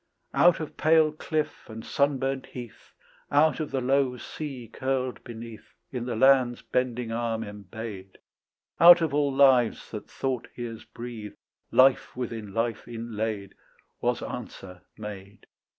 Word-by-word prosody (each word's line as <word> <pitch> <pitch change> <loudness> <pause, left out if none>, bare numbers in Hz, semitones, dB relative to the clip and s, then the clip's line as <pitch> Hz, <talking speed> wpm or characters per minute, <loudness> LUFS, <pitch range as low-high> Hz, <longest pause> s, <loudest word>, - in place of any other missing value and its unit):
Out 175 0 +5
of 155 - -6
pale 155 -1 +4
cliff 155 -2 -3
and 110 0 -8
sunburnt 135 -1 0
health, 120 -3 -11 0.4
Out 145 -1 +4
of 155 - -2
the 135 - -1
low 130 0 +2
sea 135 -4 -7
curled 130 +2 -2
beneath 115 -1 -10 0.2
In 125 -2 -4
the 120 - -2
land's 130 0 +4
bending 125 -2 -1
arm 115 -1 -1
embayed, 100 -1 -8 0.6
Out 175 0 +10
of 160 -4 0
all 145 -1 +2
lives 130 -4 +4
that 105 - -7
thought 130 -3 -3
hears 115 -2 -6
breathe 115 -3 -8 0.3
Life 130 -1 +4
within 115 -5 -4
life 115 +1 -2
inlaid, 110 -4 -4 0.5
Was - - 0
answer 90 -2 -8 0.2
made. 105 -1 -9
120 Hz, 135 wpm, -27 LUFS, 110-135 Hz, 0.6 s, Out